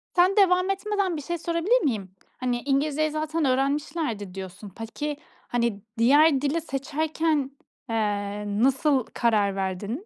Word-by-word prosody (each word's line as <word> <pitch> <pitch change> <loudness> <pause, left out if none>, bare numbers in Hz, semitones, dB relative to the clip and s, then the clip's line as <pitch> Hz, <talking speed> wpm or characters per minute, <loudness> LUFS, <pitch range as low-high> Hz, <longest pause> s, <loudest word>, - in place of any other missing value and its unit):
Sen 365 +2 +4
devam 365 -1 +4
etmeden 390 -3 -1
bir - - -4
şey 345 +4 -3
sorabilir 340 +9 +1
miyim? 210 -9 -1 0.3
Hani, 245 -1 -1
"İngilizceyi 295 +3 +1
zaten 310 0 -1
öğrenmişlerdi." 270 - -1
diyorsun. 190 +2 -8
Peki, 260 +8 -5 0.3
hani, 235 -4 -1 0.2
diğer 280 +4 +5
dili 300 +3 0
seçerken, 300 0 -1 0.4
eee, 205 -2 -1 0.2
nasıl 270 -1 +3
karar 210 -4 +2
verdin? 200 - -3
275 Hz, 125 wpm, -25 LUFS, 225-320 Hz, 0.4 s, diğer